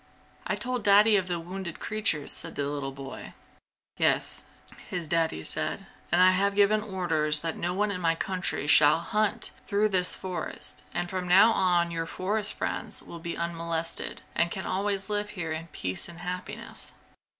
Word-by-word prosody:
"I - - 0
told 250 -2 -2
Daddy 210 +1 +6
of 190 -2 +1
the 175 -1 -2
wounded 175 0 -6
creatures!" 210 -9 0
said - - -2
the 145 - -1
little 140 -1 -3
boy. 135 0 -9 0.6
"Yes," - - +1 0.4
his 175 -3 -3
Daddy 160 - 0
said, - - -1 0.3
"and 175 - +4
I 185 0 +7
have 200 +2 +1
given 205 +1 +4
orders 165 -7 +3
that 165 -1 -2
no 175 +1 -2
one 210 +1 +1
in 180 -2 -3
my 165 -1 +2
country 185 -3 -2
shall 150 0 +7
hunt 210 +5 -1 0.2
through 210 0 +2
this 180 -2 +1
forest, 180 -3 -4
and 175 0 -2
from 185 0 -4
now 195 +6 +7
on 175 -4 +2
your 165 0 -3
forest 210 +4 -1
friends - - -4
will 170 - -9
be 170 0 -5
unmolested 170 -1 -3
and 170 +1 +2
can 190 +1 -5
always 195 0 -1
live 210 0 -1
here 165 -3 -3
in 160 +1 -4
peace 95 - 0
and 170 - -10
happiness." 180 +1 -5
180 Hz, 170 wpm, -28 LUFS, 165-200 Hz, 0.6 s, I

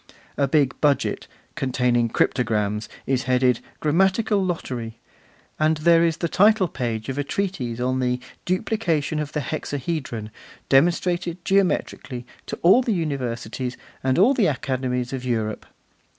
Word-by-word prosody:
A 140 - +1
big 140 -2 +2
budget, 145 -2 +1 0.3
containing 125 -2 +1
cryptograms, 105 -3 0 0.2
is 130 -1 0
headed 125 -1 +3 0.2
'Grammatical 190 +6 +2
Lottery'; 125 -10 -4 0.6
and 155 0 +3
there 165 +2 +5
is 165 -1 +1
the 170 - -1
title 205 +3 +4
page 115 -7 -3
of 135 +1 -3
a - - +1
treatise 140 -10 -3
on 130 +1 0
The 125 -1 0 0.2
Duplication 175 -6 0
of 150 0 -4
the 150 - -1
Hexahedron, 135 -5 -4 0.4
demonstrated 175 +4 +2
geometrically 175 -9 0 0.2
to - - -4
all 190 +9 +7
the 240 -3 0
Universities 125 -5 -3 0.3
and 130 0 +1
all 215 +10 +6
the 235 -7 +3
Academies 130 -2 -2
of 130 -2 -4
Europe. 110 -4 -2
140 Hz, 135 wpm, -23 LUFS, 125-170 Hz, 0.6 s, all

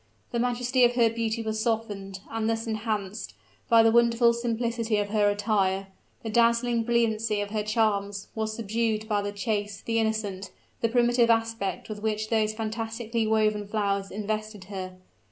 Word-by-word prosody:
The 235 - -1
majesty 250 +1 +1
of 240 0 +4
her 230 -2 +4
beauty 230 0 -2
was 220 0 -2
softened, 205 -4 -2
and 225 0 -1
thus 225 +1 -1
enhanced, 215 -2 -3 0.3
by 230 -2 +7
the 225 - +5
wonderful 235 0 +4
simplicity 235 -1 -1
of 205 -1 -1
her 205 -1 +3
attire; 200 -2 0 0.3
the 225 - -3
dazzling 235 +1 +3
brilliancy 225 -2 +1
of 205 0 -3
her 215 -1 0
charms 205 -2 0
was 220 -1 -2
subdued 220 0 -1
by 210 -2 +1
the 205 0 -3
chaste, 205 -1 -3
the 230 0 +1
innocent, 210 -4 -2 0.3
the 230 - +2
primitive 240 0 +3
aspect 225 -4 0
with 210 -1 -6
which 215 0 -1
those 215 -1 +2
fantastically 225 +1 -3
woven 215 -1 +1
flowers 200 -2 -1
invested 215 0 -4
her. 185 -1 -5
220 Hz, 160 wpm, -27 LUFS, 205-230 Hz, 0.3 s, by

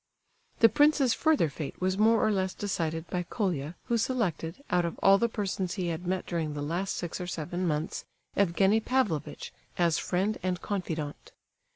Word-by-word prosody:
The 230 - +10
prince's 285 0 +4
further 315 - +3
fate 145 0 -6
was 185 0 +1
more 220 +2 +4
or 215 - +3
less 190 -2 0
decided 165 -5 -2
by 180 - 0
Colia, 175 - -2
who 235 -1 0
selected, 210 - -1
out 180 -1 +3
of 170 - -3
all 195 0 +7
the 235 - +2
persons 190 -4 -2
he 180 -4 -1
had 170 +2 -4
met 185 0 -1
during 160 -4 -2
the 145 - -3
last 175 +6 -2
six 175 0 -4
or 180 - -4
seven 175 +2 -3
months, 155 +1 -2 0.3
Evgenie 195 +3 +3
Pavlovitch, 215 - -1 0.2
as 170 -3 +2
friend 195 +4 0
and 180 0 -1
confidant. 165 -8 -4
185 Hz, 175 wpm, -29 LUFS, 165-210 Hz, 0.3 s, The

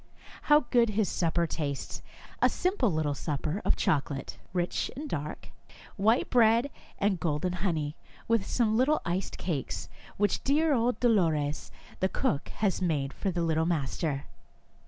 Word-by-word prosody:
How 295 0 +7
good 235 -2 +4
his 215 -1 +1
supper 170 0 +1
tastes, 145 -4 -4 0.4
a - - +6
simple 360 - +1
little 155 -2 0
supper 150 +6 -3
of - - +3
chocolate, 140 -2 -1
rich 175 -1 -1
and 295 +4 -5
dark, 150 - -5 0.5
white 220 +5 +3
bread 235 +2 +4 0.3
and 195 -3 +1
golden 160 +2 -1
honey, 165 -5 -1 0.3
with 230 -3 +2
some 220 -1 +1
little 270 +6 +2
iced 180 +2 -2
cakes, 155 -8 -3 0.3
which 205 0 +1
dear 300 +3 +3
old 235 -2 +1
Dolores, 160 -11 +1 0.3
the 190 - +2
cook, 140 - -1
has 200 -3 -1
made 145 -6 0
for 200 - -2
the 175 -2 -1
little 160 0 +1
master. 145 -2 -1
180 Hz, 145 wpm, -29 LUFS, 155-230 Hz, 0.5 s, How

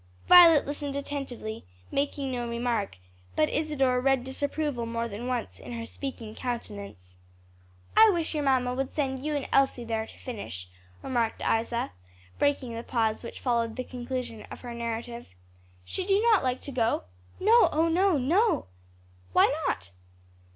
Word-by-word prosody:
Violet 340 -4 +8
listened 285 0 -4
attentively, 275 -6 -5 0.3
making 280 -1 -1
no 240 -1 -3
remark, 235 - -1 0.4
but 155 - +3
Isadore 275 -5 +1
read 270 -1 +2
disapproval 280 -1 -2
more 230 0 -2
than 230 +3 -6
once 250 -2 -3
in - - -8
her 230 -1 -4
speaking 235 -4 -6
countenance. 200 - -6 0.8
"I 445 - +8
wish 340 -5 0
your 300 -1 -1
mamma 255 -2 +2
would 265 +1 -2
send 265 -3 -2
you 305 0 -1
and 285 - -2
Elsie 270 -3 +3
there 225 -1 -2
to - - -14
finish," 200 - -6 0.4
remarked 235 -4 -1
Isa, 230 - 0 0.5
breaking 275 -4 +1
the 230 - -4
pause 225 -2 0
which 235 - -8
followed 235 -3 0
the 255 - -3
conclusion 250 -3 -5
of - - -9
her 245 -1 -6
narrative. 235 0 -4 0.6
"Should 375 - -4
you 390 +1 +5
not 425 - +4
like 255 0 -1
to 280 - -6
go?" 230 - +1 0.4
"No, 455 +4 +6
oh 320 +2 +2
no, 360 +1 +3
no!" 355 - +2 0.7
"Why - - +5
not?" 90 -1 -2
250 Hz, 155 wpm, -28 LUFS, 230-285 Hz, 0.8 s, Violet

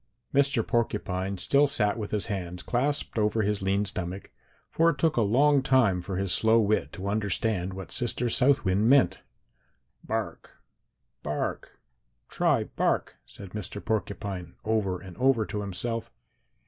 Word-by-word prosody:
"Mr. 140 -4 +3
Porcupine 100 -4 -1
still 140 +9 +3
sat 105 -7 +1
with 105 -3 -5
his 105 0 -1
hands 90 -5 -4
clasped 135 -1 -1
over 105 +1 +1
his 105 0 -1
lean 100 +2 +1
stomach, 95 0 -5 0.4
for 165 +1 +3
it 150 - -1
took 160 +2 +1
a 120 - +2
long 135 +7 +4
time 125 -9 +3
for 95 +1 -5
his 95 -1 -1
slow 110 +4 +4
wit 110 -1 +1
to 95 +1 -6
understand 100 -2 -1
what 95 -3 -8
Sister 120 0 0
South 135 +2 +3
Wind 100 +5 +2
meant. 110 -9 +4 0.8
'Bark, - - -5 0.6
bark, - - -4 0.5
try - - +2
bark,' - - -1
said 100 -2 -10
Mr. 105 0 -5
Porcupine 100 -5 -3
over 105 -5 0
and 95 -3 -11
over 130 -4 +3
to 105 - -4
himself. 115 +4 -4
105 Hz, 150 wpm, -27 LUFS, 95-120 Hz, 0.8 s, long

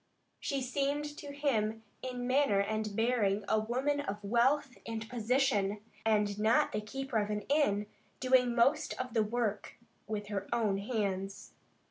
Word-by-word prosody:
She 275 -2 -2
seemed 280 +3 0
to 285 - -7
him 225 -7 0 0.2
in 250 -1 -4
manner 255 -5 +3
and 215 0 -1
bearing 215 -3 +1
a 220 - +3
woman 260 +6 0
of 205 -8 -3
wealth 245 +5 +2
and 225 -1 -5
position, 230 -4 +1 0.2
and 210 -2 +2
not 220 +2 +3
the 210 - -2
keeper 260 +2 -2
of 205 0 -1
an 210 0 -1
inn, 210 -6 +2 0.3
doing 255 -2 +3
most 270 +6 +2
of 255 -2 -4
the 225 - +3
work 215 -1 -1 0.3
with 210 -1 -3
her 200 -1 -3
own 215 -4 +1
hands. 200 -3 -3
225 Hz, 150 wpm, -32 LUFS, 210-260 Hz, 0.3 s, manner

